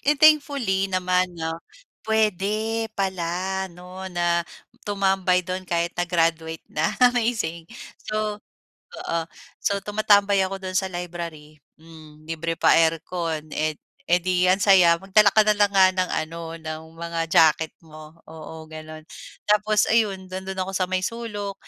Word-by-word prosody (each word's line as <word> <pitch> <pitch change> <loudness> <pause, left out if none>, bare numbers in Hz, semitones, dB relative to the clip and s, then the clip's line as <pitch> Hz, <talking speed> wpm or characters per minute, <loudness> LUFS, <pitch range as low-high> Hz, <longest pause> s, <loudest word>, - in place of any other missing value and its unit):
Eh, 295 +1 +2
thankfully 280 -10 +3
naman 185 -1 0
'no, 165 0 -4 0.4
puwede 220 +1 0
pala 190 0 -2
'no 180 +2 -9
na, 175 -1 +1 0.4
tumambay 190 -3 +1
do'n 185 0 -5
kahit 170 0 0
na 175 0 -2
graduate 165 -2 0
na, 155 - 0 0.2
amazing. 220 -9 -2 0.3
So, 215 -1 -3 0.6
oo. 165 0 -2 0.4
So, 200 - 0
tumatambay 205 -1 +3
ako 195 +1 -4
do'n 185 0 -4
sa 190 - -1
library, 170 -4 -7 0.2
hmm, 155 -2 -15
libre 165 +1 -3
pa - - +4
aircon, 165 -1 0
eh, 155 0 -1 0.3
eh 175 - +5
di 180 0 0
ang 190 - +3
saya. 180 -4 +6
Magdala 200 +2 +4
ka 215 - +6
na 215 - +4
lang 205 -1 +3
nga 190 -1 +6
ng 185 -1 0
ano, 165 +2 -3 0.2
ng 155 0 -6 0.2
mga 170 0 -4
jacket 160 0 +4
mo, 155 0 -13
oo, 160 0 -10
gano'n. 155 0 -10 0.4
Tapos 210 0 +3
ayun, 205 -4 +1
nando'n 190 +1 -6
ako 190 +1 -3
sa 185 -1 +1
may 185 0 +1
sulok, 205 -3 -4
185 Hz, 145 wpm, -24 LUFS, 165-200 Hz, 0.6 s, saya